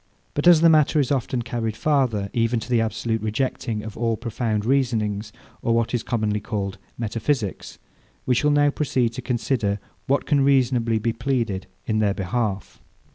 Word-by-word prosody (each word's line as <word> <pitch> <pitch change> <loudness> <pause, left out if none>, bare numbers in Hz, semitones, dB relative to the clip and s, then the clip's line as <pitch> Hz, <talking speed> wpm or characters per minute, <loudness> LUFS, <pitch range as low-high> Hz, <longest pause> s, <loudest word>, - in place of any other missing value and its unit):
But 145 +4 0
as 170 -3 +8
the 170 - +7
matter 155 -1 +4
is 140 -2 +1
often 130 -2 0
carried 115 -2 -3
farther, 125 -10 +1
even 115 0 +1
to 115 - -8
the 120 -2 +4
absolute 115 0 -1
rejecting 110 0 -2
of 110 - -7
all 115 -1 0
profound 115 -2 -2
reasonings, 110 -5 0 0.3
or 115 - +1
what 115 +1 0
is 120 - +1
commonly 110 -3 -1
called 100 -3 -4 0.2
metaphysics, 115 -1 -2 0.5
we 130 - +2
shall 150 +4 +2
now 145 0 +4
proceed 130 -5 0
to 120 +3 -7
consider 115 -4 -1 0.3
what 140 +1 +1
can 145 -3 +2
reasonably 125 -4 +3
be 115 +1 -1
pleaded 115 -6 -2 0.2
in 110 -1 0
their 105 -2 +2
behalf. 100 0 -3
115 Hz, 170 wpm, -23 LUFS, 110-130 Hz, 0.5 s, as